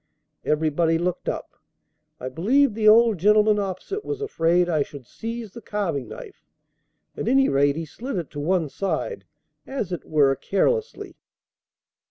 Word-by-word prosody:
Everybody 160 Hz, +2 st, +1 dB
looked 175 Hz, +1 st, -2 dB
up. -, -, -5 dB, 0.7 s
I 130 Hz, -, -5 dB
believe 230 Hz, -, +2 dB
the 215 Hz, 0 st, +1 dB
old 225 Hz, -2 st, +6 dB
gentleman 210 Hz, +2 st, +4 dB
opposite 200 Hz, -, -4 dB
was 425 Hz, -1 st, -4 dB
afraid 175 Hz, -, +1 dB
I 160 Hz, -4 st, +1 dB
should 140 Hz, -2 st, -6 dB
seize 230 Hz, -, -6 dB
the 235 Hz, -, -9 dB
carving 190 Hz, -, -3 dB
knife; 460 Hz, -6 st, -11 dB, 0.7 s
at -, -, -4 dB
any 270 Hz, +2 st, +4 dB
rate, 140 Hz, +1 st, +3 dB
he 165 Hz, +1 st, -4 dB
slid 235 Hz, -, -6 dB
it 170 Hz, -4 st, -4 dB
to 145 Hz, -, -6 dB
one 165 Hz, +2 st, +1 dB
side, 195 Hz, -, -3 dB, 0.4 s
as 265 Hz, -9 st, -4 dB
it 175 Hz, -, -4 dB
were 140 Hz, -3 st, +3 dB
carelessly. 450 Hz, -, -1 dB
190 Hz, 150 wpm, -24 LUFS, 160-235 Hz, 0.7 s, old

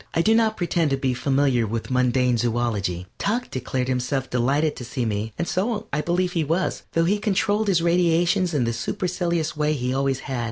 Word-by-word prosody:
I 165 Hz, -, +3 dB
do 220 Hz, -, +4 dB
not 225 Hz, -1 st, +2 dB
pretend 170 Hz, -3 st, +1 dB
to 135 Hz, -, +1 dB
be 135 Hz, -1 st, 0 dB
familiar 135 Hz, -2 st, +1 dB
with 115 Hz, +4 st, -4 dB
mundane 125 Hz, 0 st, +2 dB
zoölogy. 110 Hz, -7 st, -1 dB
Tuck 235 Hz, +5 st, -1 dB
declared 130 Hz, 0 st, -2 dB
himself 130 Hz, +1 st, -1 dB
delighted 140 Hz, +5 st, +1 dB
to -, -, -6 dB
see 125 Hz, 0 st, -3 dB
me, 110 Hz, 0 st, -2 dB
and 170 Hz, -, -2 dB
so 210 Hz, +3 st, -1 dB
I 150 Hz, -, +1 dB
believe 175 Hz, +2 st, 0 dB
he 170 Hz, -3 st, 0 dB
was, 165 Hz, +5 st, -1 dB
though 165 Hz, 0 st, +2 dB
he 205 Hz, +4 st, +1 dB
controlled 205 Hz, +1 st, +1 dB
his 175 Hz, -4 st, +2 dB
radiations 175 Hz, +1 st, +2 dB
in 135 Hz, -, +2 dB
the 115 Hz, 0 st, 0 dB
supercilious 170 Hz, +5 st, -2 dB
way 150 Hz, 0 st, +1 dB
he 125 Hz, -3 st, -2 dB
always 135 Hz, -1 st, 0 dB
had. 130 Hz, -3 st, -4 dB
145 Hz, 200 wpm, -23 LUFS, 125-175 Hz, -, do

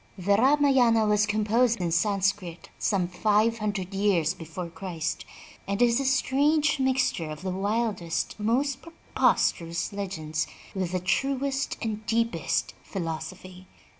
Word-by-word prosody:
The 200 Hz, +2 st, +2 dB
Ramayana 260 Hz, -3 st, +4 dB
was 210 Hz, 0 st, +3 dB
composed 220 Hz, +3 st, +2 dB
in 175 Hz, -2 st, -1 dB
Sanscrit 190 Hz, -1 st, 0 dB
some 190 Hz, -4 st, +1 dB
five 215 Hz, +5 st, +1 dB
hundred 200 Hz, -3 st, -3 dB
years 190 Hz, -5 st, +2 dB
before 170 Hz, +1 st, -7 dB
Christ, 170 Hz, -2 st, -4 dB, 0.4 s
and 200 Hz, +1 st, -2 dB
is 240 Hz, 0 st, +4 dB
a 275 Hz, -, -2 dB
strange 285 Hz, +3 st, +2 dB
mixture 255 Hz, -11 st, +1 dB
of 155 Hz, +3 st, -8 dB
the 190 Hz, -, -2 dB
wildest 195 Hz, -3 st, -1 dB
and 210 Hz, -, -2 dB
most 270 Hz, +3 st, +1 dB
preposterous 170 Hz, -, 0 dB
legends 160 Hz, -6 st, -3 dB, 0.3 s
with 185 Hz, -3 st, -3 dB
the 185 Hz, -, +1 dB
truest 270 Hz, +7 st, -1 dB
and 215 Hz, -1 st, -3 dB
deepest 230 Hz, +1 st, 0 dB
philosophy. 185 Hz, +1 st, -6 dB
205 Hz, 130 wpm, -27 LUFS, 180-240 Hz, 0.4 s, Ramayana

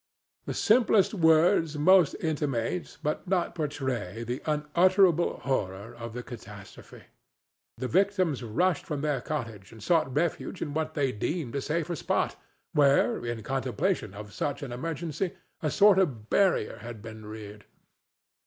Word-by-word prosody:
The -, -, -3 dB
simplest 220 Hz, -3 st, +4 dB
words 160 Hz, -3 st, +4 dB
must 180 Hz, +1 st, +5 dB
intimate, 150 Hz, 0 st, -2 dB
but 150 Hz, +5 st, -2 dB
not 180 Hz, -1 st, 0 dB
portray, 130 Hz, -, -3 dB
the 120 Hz, +2 st, -4 dB
unutterable 170 Hz, +4 st, +3 dB
horror 105 Hz, -4 st, -2 dB
of 115 Hz, -1 st, -7 dB
the 125 Hz, +1 st, -5 dB
catastrophe. 105 Hz, -5 st, -11 dB, 0.7 s
The 130 Hz, -, -3 dB
victims 185 Hz, -4 st, +1 dB
rushed 160 Hz, +10 st, 0 dB
from 150 Hz, -3 st, -4 dB
their 145 Hz, -4 st, 0 dB
cottage 115 Hz, -10 st, -5 dB
and 110 Hz, -2 st, -12 dB
sought 165 Hz, -6 st, +2 dB
refuge 170 Hz, +3 st, -1 dB
in 145 Hz, -, -4 dB
what 155 Hz, 0 st, -2 dB
they 135 Hz, -3 st, +1 dB
deemed 130 Hz, +4 st, -3 dB
a 140 Hz, -, -1 dB
safer 170 Hz, +4 st, -2 dB
spot, -, -, -1 dB, 0.4 s
where, 140 Hz, -4 st, +3 dB
in 120 Hz, -2 st, -4 dB
contemplation 135 Hz, -, -1 dB
of 105 Hz, 0 st, -9 dB
such 145 Hz, 0 st, -3 dB
an 135 Hz, -, -6 dB
emergency, 165 Hz, +6 st, -3 dB, 0.3 s
a 155 Hz, -, 0 dB
sort 200 Hz, +3 st, +5 dB
of 125 Hz, -, -1 dB
barrier 195 Hz, -2 st, +2 dB
had 115 Hz, -3 st, -9 dB
been 110 Hz, -1 st, -9 dB
reared. 105 Hz, -1 st, -9 dB
145 Hz, 145 wpm, -28 LUFS, 115-170 Hz, 0.7 s, must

